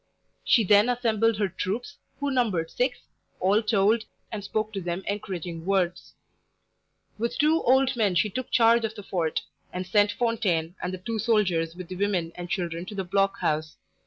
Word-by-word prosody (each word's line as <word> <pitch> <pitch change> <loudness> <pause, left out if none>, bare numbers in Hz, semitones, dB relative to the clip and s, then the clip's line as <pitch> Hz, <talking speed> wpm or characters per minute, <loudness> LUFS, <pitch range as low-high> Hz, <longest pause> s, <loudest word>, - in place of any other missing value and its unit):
She 230 - +4
then 205 +4 +5
assembled 225 -3 +1
her 205 -1 +1
troops, 200 +8 -4 0.2
who 285 -1 -1
numbered 205 -11 0
six, 250 0 0 0.4
all 200 +4 +3
told, 215 +1 +2 0.3
and 210 -3 -5
spoke 215 +2 -2
to 195 - -3
them 175 +2 -3
encouraging 180 -5 -4
words. 185 -2 -1 1.0
With 235 +1 -2
two 310 +2 +3
old 265 +1 +3
men 210 -6 +1
she 210 +4 +2
took 255 +4 -4
charge 230 0 +4
of 220 0 -2
the 205 - -8
fort, 170 -5 -1 0.3
and 185 0 -4
sent 205 +2 +3
Fontaine 185 -9 0
and 180 - -2
the 185 - -4
two 225 -1 -2
soldiers 185 -8 +1
with 180 -1 -8
the 185 - -7
women 185 -4 0
and 175 0 -7
children 170 -2 -2
to 210 - -7
the 195 - -2
block 195 +2 0
house. 155 -2 -1
200 Hz, 180 wpm, -26 LUFS, 180-225 Hz, 1.0 s, then